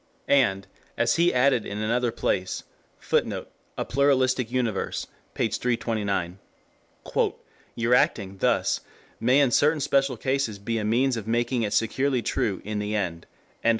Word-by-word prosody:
And, 100 -9 +3 0.3
as - - +2
he 170 +1 +4
added 125 -2 +3
in 105 - -6
another 115 +3 0
place, 95 -4 -2 0.3
[Footnote: - - -1 0.3
A - - -2
Pluralistic 130 -3 +2
Universe, 120 -5 -1 0.3
p. - - +1
329.] 100 -7 -1 1.4
"your 115 +1 +1
acting 100 -5 +2
thus - - +1 0.4
may 125 +4 +4
in 140 -4 +3
certain 150 +5 +3
special 135 -2 +1
cases 130 -3 -1
be 115 +3 -2
a - - -3
means 120 +4 +2
of 110 -1 -6
making 120 +2 0
it 105 -2 -1
securely 130 +2 +1
true 110 -8 -1
in 105 0 -3
the 105 +1 -2
end." 85 -5 -3
120 Hz, 140 wpm, -25 LUFS, 105-130 Hz, 1.4 s, he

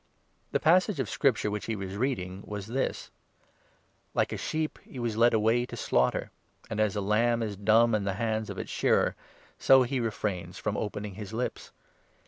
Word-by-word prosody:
The - - +1
passage 180 +2 +3
of 130 - 0
Scripture 115 -7 +1
which 105 0 -4
he 115 - -1
was 95 -1 -5
reading 100 -6 -2
32 100 - -13
was 105 -2 -4
this 130 +5 -2 0.3
— - - -36
' - - -41
Like - - +1
a - - -3
sheep, 155 0 -2
he - - -12
was 120 -3 -2
led 120 +2 +5
away 110 +3 +3
to - - -8
slaughter, 65 +1 +1 0.4
And 110 - -2
as 110 -2 +2
a 105 - -1
lamb 115 +3 +2
is 105 -2 -3
dumb 110 +3 +4
in 105 -2 +1
the 100 -1 -1
hands 110 0 -1
of - - -6
its - - -5
shearer, - - +2 0.4
So 130 -1 +6
he 130 +1 -1
refrains 100 -6 -3
from 105 - -2
opening1 105 -1 -4
his 105 -1 -7
lips. 125 +3 -4
110 Hz, 200 wpm, -29 LUFS, 105-120 Hz, 0.4 s, So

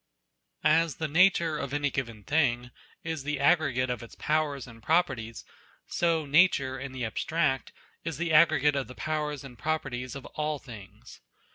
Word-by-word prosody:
As 160 0 +3
the 160 - -2
nature 165 -1 +3
of 140 +1 -3
any 145 -1 0
given 115 -6 -4
thing 125 -3 +1 0.3
is 160 -3 -3
the 145 0 -3
aggregate 140 -5 +2
of 125 - -4
its 115 - -11
powers 150 -4 -1
and 115 -2 -14
properties, 130 -7 0 0.4
so 165 -2 0
Nature 140 -4 +3
in 135 0 -6
the 130 -2 -4
abstract 145 +4 -1 0.3
is 165 -4 -4
the 170 0 -1
aggregate 155 -2 +5
of 135 -2 -2
the 125 - -11
powers 150 -2 -3
and 125 -3 -12
properties 125 -5 -3
of 135 - -8
all 150 0 -3
things. 110 -8 -13
145 Hz, 160 wpm, -28 LUFS, 130-155 Hz, 0.4 s, aggregate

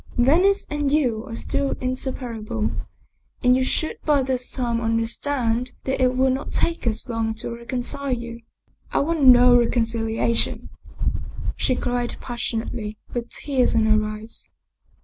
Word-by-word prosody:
Venice 355 +11 +4
and 295 -2 0
you 250 -6 +1
are 230 - -6
still 275 +3 -1
inseparable, 245 -4 -3 0.7
and 250 0 +6
you 260 - +2
should 315 +4 -1
by 290 -3 +3
this 255 -1 -1
time 235 -3 -1
understand 230 +2 0
that 265 0 -1
it 255 0 +3
will 265 0 +4
not 265 - -3
take 335 -7 0
us 225 +3 -1
long 225 -2 -1
to 220 - -5
reconcile 250 +3 -3
you." 235 -1 -4 0.3
" - - -35
I - - 0
want 320 +2 +1
no 250 -2 +8
reconciliation," 230 -1 +1 0.9
she 255 - +1
cried 245 -1 -1
passionately, 225 -2 -4 0.2
with 240 -1 -3
tears 265 -5 0
in 225 -1 +4
her 215 0 +4
eyes. 215 +1 -5
245 Hz, 145 wpm, -23 LUFS, 230-265 Hz, 0.9 s, no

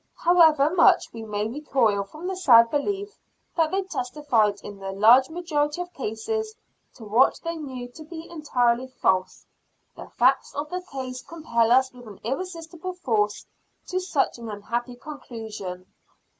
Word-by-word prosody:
However 320 -3 +5
much 360 +1 +4
we 230 - -7
may 210 -1 -2
recoil 235 -5 +1
from 310 - -11
the 380 +1 -2
sad 235 -10 +6
belief 400 +7 -2 0.4
that 325 -2 +2
they 385 +2 0
testified 245 - 0
in 205 -1 -9
the 195 0 -5
large 230 +7 +6
majority 320 -2 -1
of 355 0 -5
cases 435 - -3 0.4
to 235 - -12
what 225 +6 +3
they 335 0 -3
knew 260 -6 -6
to 310 +6 -12
be 320 +1 -9
entirely 255 -6 0
false, 185 -7 0 0.5
the - - -10
facts 260 +3 +2
of 295 +3 -4
the 365 0 -3
case 255 -2 -5
compel 235 -9 0
us 260 +1 +4
with 245 -2 -13
an 205 -3 -11
irresistible 335 - -5
force 220 - -1 0.4
to 370 - 0
such 340 -9 -1
an 230 -1 -7
unhappy 235 +4 -4
conclusion. 220 -10 -8
265 Hz, 155 wpm, -25 LUFS, 230-330 Hz, 0.5 s, sad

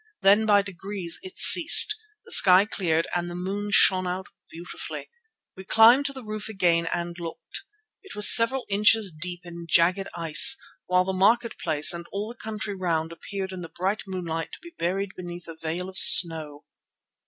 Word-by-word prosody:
Then 205 +3 +2
by 205 -1 +2
degrees 190 -2 -6
it 375 +1 -13
ceased, 345 +5 +6 0.3
the - - -13
sky 185 +1 +6
cleared 165 -6 -3
and 175 0 -4
the 175 - -10
moon 195 +3 -6
shone 185 -3 +2
out 185 +1 -6 0.2
beautifully. 170 +2 -11 0.4
We 190 - -12
climbed 230 +8 +3
to - - -7
the 260 -2 -12
roof 215 0 -8
again 175 -5 -1
and 170 0 -6
looked. 165 -1 -11 0.4
It 390 - -14
was 210 - +5
several 245 +3 +4
inches 210 0 0
deep 175 +3 -8
in 170 -1 -12
jagged 180 +5 0
ice, 170 - +4 0.3
while 180 0 0
the 190 +1 -6
market 225 +5 -1
place 155 0 +2
and 170 0 -10
all 205 +2 -7
the 240 - -19
country 215 -1 -7
round 165 -4 -4
appeared 190 +3 -9
in 185 -1 -10
the 165 - -11
bright 190 +4 -5
moonlight 165 -4 -7
to - - -12
be 340 +1 -15
buried 190 - -5
beneath 175 -1 -11
a 165 - -11
veil 165 +3 -7
of 190 0 -4
snow. 155 -4 +5
185 Hz, 180 wpm, -23 LUFS, 170-210 Hz, 0.4 s, ceased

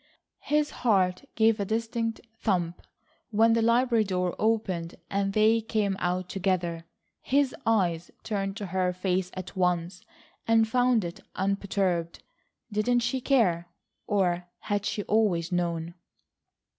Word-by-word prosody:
His 300 0 0
heart 185 -6 +2
gave 220 0 +3
a - - +1
distinct 225 +2 -2 0.2
thump 175 -5 -1 0.5
when 225 +1 +4
the 230 - +2
library 235 0 +3
door 180 -3 -1
opened 190 -6 0 0.2
and 195 0 0
they 220 +2 +4
came 215 -3 0
out 180 +1 -1
together. 175 -3 -1 0.4
His 280 0 +2
eyes 175 -7 +1
turned 195 -2 -2
to 210 - -4
her 185 0 0
face 185 0 -1
at 185 -1 -7
once, 180 -1 0 0.5
and 225 -1 +4
found 245 -3 +2
it 170 - -6 0.2
unperturbed. 190 -3 -1 0.5
Didn't 240 +4 +2
she 245 +2 -1
care, 190 -11 +2 0.4
or 180 -3 +1
had 205 0 -1
she 205 - -2
always 195 -6 +1
known? 170 -1 -1
195 Hz, 130 wpm, -27 LUFS, 180-225 Hz, 0.5 s, when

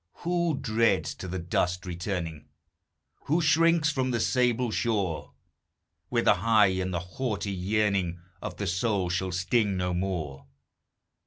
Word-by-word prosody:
Who 170 -3 +1
dreads 115 +1 +1
to - - -8
the 95 +1 -3
dust 90 +1 -1
returning? 85 -4 -4 0.8
Who 160 +4 +2
shrinks 165 -1 +4
from 130 -2 -1
the 120 -2 0
sable 125 -1 +1
shore, 95 - -1 0.8
Where - - +1
the - - +6
high 110 -4 +4
and 95 0 -2
haughty 100 +4 -3
yearning 95 -2 0 0.2
Of - - -6
the 100 - -3
soul 95 -1 0
shall 90 +1 -1
sting 95 +3 +1
no 90 0 -1
more! 80 -7 -3
100 Hz, 135 wpm, -28 LUFS, 90-120 Hz, 0.8 s, the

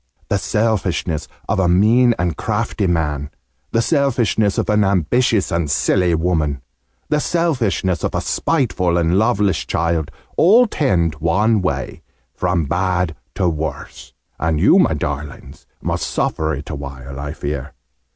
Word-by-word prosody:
The 100 - +1
selfishness 95 -8 -1 0.2
of - - 0
a 95 - +3
mean 115 +7 +4
and 85 -3 -1
crafty 105 -2 -1
man 75 -4 -1 0.4
the 115 0 +1
selfishness 115 - +1
of - - 0
an 105 0 +3
ambitious 100 +4 +1
and 85 -3 -1
silly 90 +3 +2
woman 80 -5 -1 0.5
the 150 0 +2
selfishness 120 - 0
of - - -1
a - - 0
spiteful 100 - 0
and 85 +2 +2
loveless 105 -3 +1
child 85 -2 -1 0.3
all 225 +9 +6
tend 90 - +1
one 100 +7 +2
way, 70 -8 -3 0.3
from 90 -3 0
bad 90 +1 0 0.2
to 90 - +1
worse! 80 -3 -5 0.3
And 80 -2 0
you, - - +5
my - - +3
darlings, 70 -2 -6 0.2
must - - -2
suffer 80 -1 -1
it 70 +3 -7
awhile, 70 -2 -7
I 70 +1 -4
fear. 70 -2 -5
90 Hz, 140 wpm, -19 LUFS, 80-110 Hz, 0.5 s, all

